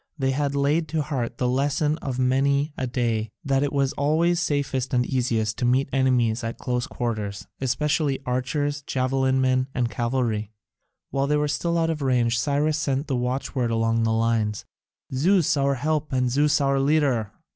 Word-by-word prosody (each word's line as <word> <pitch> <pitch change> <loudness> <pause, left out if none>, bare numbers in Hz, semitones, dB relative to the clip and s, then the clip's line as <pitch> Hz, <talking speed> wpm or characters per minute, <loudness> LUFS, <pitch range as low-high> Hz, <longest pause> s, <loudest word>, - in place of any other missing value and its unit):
They 135 -2 +1
had 140 +1 -1
laid 145 +4 +1
to 155 0 -1
heart 130 -5 -3
the 125 - 0
lesson 145 +4 0
of 130 -3 -4
many 140 +3 +1
a 130 - -2
day 115 -3 -1 0.2
that 135 -1 +2
it 145 0 0
was 140 -2 +1
always 165 +4 +2
safest 140 -4 -1
and 125 0 +2
easiest 115 -4 -1
to 125 - 0
meet 130 +3 +2
enemies 125 -3 +2
at 115 0 -4
close 125 -1 -2
quarters, 105 -4 -4
especially 140 +2 0
archers, 145 +3 -1
javelin 130 -1 0
men, 130 0 +2
and 120 -3 0
cavalry. 115 -3 -1 0.6
While 135 0 0
they 150 +1 +2
were 150 0 +1
still 170 +3 -1
out 165 0 +1
of 155 -2 -4
range, 120 -3 +2
Cyrus 150 +1 +1
sent 140 -1 -1
the 135 - -2
watchword 125 0 -1
along 115 0 +1
the 115 0 +1
lines, 110 -2 0 0.5
"Zeus 170 +4 +3
our 140 -1 +1
help 155 +3 -1
and 125 -1 +1
Zeus 145 +3 +3
our 140 -1 +2
leader." 135 -7 +1
135 Hz, 175 wpm, -24 LUFS, 125-145 Hz, 0.6 s, Zeus